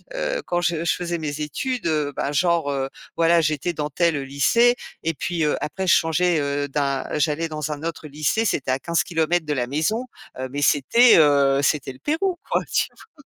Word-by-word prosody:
heu, - - -2
quand 175 0 0
je 165 -1 0
je - - +2
faisais 175 -1 -3
mes 150 -2 -4
études, 250 - -3
heu, 150 -3 0
bah, 140 - -2
genre, 165 -1 +1
heu, 135 -1 -2 0.3
voilà, 170 0 +4
j'étais 155 +2 -1
dans 150 -2 -3
tel, 170 +2 +1
heu, 145 - -2
lycée 230 - +3 0.3
et 165 - 0
puis, 170 +2 -2
heu, 150 - +1
après 190 +5 -3
je - - +6
changeais, 165 +1 +2
heu, 145 0 -1
d'un 140 -1 -1 0.2
j'allais 155 +2 0
dans 150 -1 -4
un 150 +1 -6
autre 165 -1 -5
lycée, 155 +10 0
c'était 135 - 0
à 130 - 0
15 170 +3 0
kilomètres 165 0 0
de 150 - -1
la 125 -3 -1
maison, 160 - -1 0.3
heu, 130 - -3
mais 145 +1 -3
c'était, 225 - +5
heu, 140 -3 +4
c'était 145 -2 0
le 130 - -18
Pérou 345 +4 -1
quoi, - - +1
tu - - +2
vois? 320 -10 -19
155 Hz, 210 wpm, -22 LUFS, 145-175 Hz, 0.3 s, je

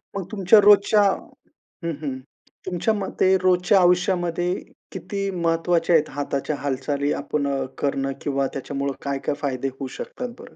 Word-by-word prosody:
मग 200 - -2
तुमच्या 205 0 +5
रोजच्या 205 +1 +6
हं, 185 -3 -4
हं. 135 -4 -3 0.5
तुमच्या 185 +4 0
मते 190 -2 +1
रोजच्या 185 +2 +4
आयुष्यामध्ये 175 -1 +2 0.4
किती 200 -1 -4
महत्वाच्या 170 -1 +1
आहेत 155 -1 +3
हाताच्या 145 +1 -2
हालचाली 140 +1 -1
आपण 145 0 -2
अ, 135 -1 -1
करणं? 135 -1 -1
किंवा 140 -1 0
त्याच्यामुळं 140 0 -3
काय-काय 140 +1 -2
फायदे 135 -2 -2
होऊ 135 - -4
शकतात 250 -1 -6
बरं? - - -13
165 Hz, 135 wpm, -23 LUFS, 140-185 Hz, 0.5 s, रोजच्या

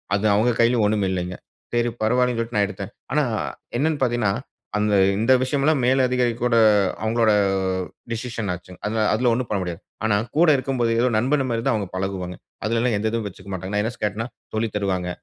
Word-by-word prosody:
அது 100 +2 -1
அவுங்க 115 +4 +3
கையிலும் 115 -1 +3
ஒன்னும் 105 -1 +1
இல்லேங்க. 90 -1 -3 0.4
சரி 120 0 +2
பரவாயில்லன்னு 125 +2 +2
சொல்லிட்டு 115 0 -3
நான் 100 -1 +3
எடுத்தேன். 100 -2 -7 0.2
ஆனா, - - +3 0.5
என்னன்னு 150 +2 +1
பார்த்தீங்கன்னா, 120 -5 +1 0.5
அந்த 105 0 +1 0.3
இந்த 115 +4 +2
விஷயமெல்லாம் 140 +2 +1
மேலதிகாரி 125 -2 +2
கூட 125 -1 +2 0.5
அவுங்களோட 110 0 +3 0.8
டிசிஷன் 115 -3 -4
ஆச்சுங்க. 90 +1 -11
அந்த 110 +1 -1
அதுல 120 +2 +2
ஒன்னும் 125 +1 -1
பண்ண 105 - 0
முடியாது. 85 -2 -5 0.2
ஆனா 110 -2 +3 0.2
கூட 170 +2 +5
இருக்கும்போது 130 -3 0
ஏதோ 125 - +3
நண்பன்மாரி 130 -1 +1
தான் 135 - +3
அவுங்க 105 -3 -2
பழகுவாங்க. 95 -1 -3 0.3
அதுலலாம் 115 +1 +1
எந்த 105 +2 -1
இதுவும் 115 -1 -2
வச்சுக்கமாட்டாங்க. 95 0 -7
நான் 105 - +2
எதுனாச்சும் 120 +1 -5
கேட்டன்னா, 105 +3 -2 0.3
சொல்லித் 110 0 -1
தருவாங்க. 95 -3 -1
115 Hz, 170 wpm, -23 LUFS, 100-125 Hz, 0.8 s, கூட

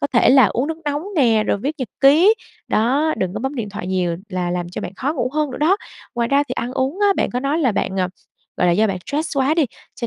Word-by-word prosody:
Có 285 - +1
thể 240 - +5
là 265 -3 +7
uống 245 +8 -1
nước 320 0 -4
nóng 290 +1 -1
nè, 230 -6 +4
rồi - - +1
viết 280 +8 -2
nhật 255 - -3
ký, 320 +10 +6 0.3
đó, 275 +8 +2
đừng 185 +1 -2
có 215 - -3
bấm 265 +3 -3
điện 225 -5 -4
thoại 200 -3 -6
nhiều 180 -2 -1
là 180 -2 -2
làm 175 -1 -3
cho 180 - -6
bạn 180 - -6
khó 280 +4 -1
ngủ 255 -5 -1
hơn 305 -2 0
nữa - - -6
đó. 330 +6 +3 0.4
Ngoài 235 0 0
ra 280 +1 +3
thì - - -4
ăn 250 0 -3
uống 270 +8 -1
á, 410 - +4
bạn - - 0
có 250 - -2
nói 285 +4 0
là 255 -9 +2
bạn, 190 -1 -1
à, 185 - 0 0.5
gọi 180 - +3
là, 175 - +4
do 215 +5 +3
bạn 190 -2 -2
stress 295 +1 -3
quá 275 +4 +2
đi, 325 -3 +3 0.3
cho 235 - -4
255 Hz, 280 wpm, -20 LUFS, 205-290 Hz, 0.5 s, là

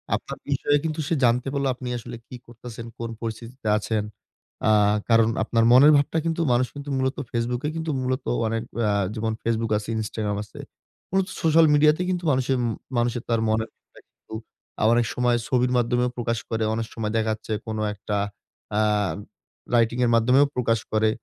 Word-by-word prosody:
আপনার - - -6
বিষয়ে 145 +1 +2
কিন্তু 160 -1 -3
সে - - 0
জানতে 120 +2 +3
পারলো 140 -1 0
আপনি 125 0 -8
আসলে 120 +1 -8
কি 125 - -9
করতেছেন, 115 -1 -9
কোন 115 - -4
পরিস্থিতিতে 115 +1 -6
আছেন? 110 0 -1 0.7
আ - - +5 0.4
কারণ 115 -1 +5
আপনার 115 0 +1
মনের 140 +5 +8
ভাবটা 145 +3 0
কিন্তু 165 0 0
মানুষ 125 +1 +2
কিন্তু 145 0 -7
মূলত 130 +1 0 0.2
Facebook 120 +2 -1
এই - - -2
কিন্তু 160 -1 -2
মূলত 130 +1 -2 0.2
অনেক 115 0 -2 0.3
আ - - +2 0.2
যেমন 110 0 -1
Facebook 115 -1 -1
আছে, 105 - -6
Instagram 105 -1 -3
আছে। 105 - -13 0.5
মূলত 190 -1 +1
সোশ্যাল 165 0 +5
মিডিয়া 150 +1 +6
তে - - -3
কিন্তু 180 -1 -1
মানুষে 130 0 0
উম - - 0 0.3
মানুষের 120 0 0
তার 115 - +2
মনের 110 +1 0
ভাবটা - - -21
কিন্তু - - -17 0.5
আ - - +2
অনেক 120 0 +3
সময় 125 -1 +2
ছবির 125 -2 +1
মাধ্যমেও 125 +1 +1
প্রকাশ 115 -1 -1
করে। 110 0 -1
অনেক 115 0 -2
সময় 105 -2 -3
দেখা 110 0 +1
যাচ্ছে 110 +1 -9 0.2
কোন 110 - -3 0.2
একটা 105 0 -3 0.6
আ 110 - +3 0.9
রাইটিং 115 +1 +2
এর 120 - +2
মাধ্যমেও 125 +5 +5
প্রকাশ 115 -3 +1
করে। 110 0 +3
120 Hz, 180 wpm, -24 LUFS, 115-130 Hz, 0.9 s, মনের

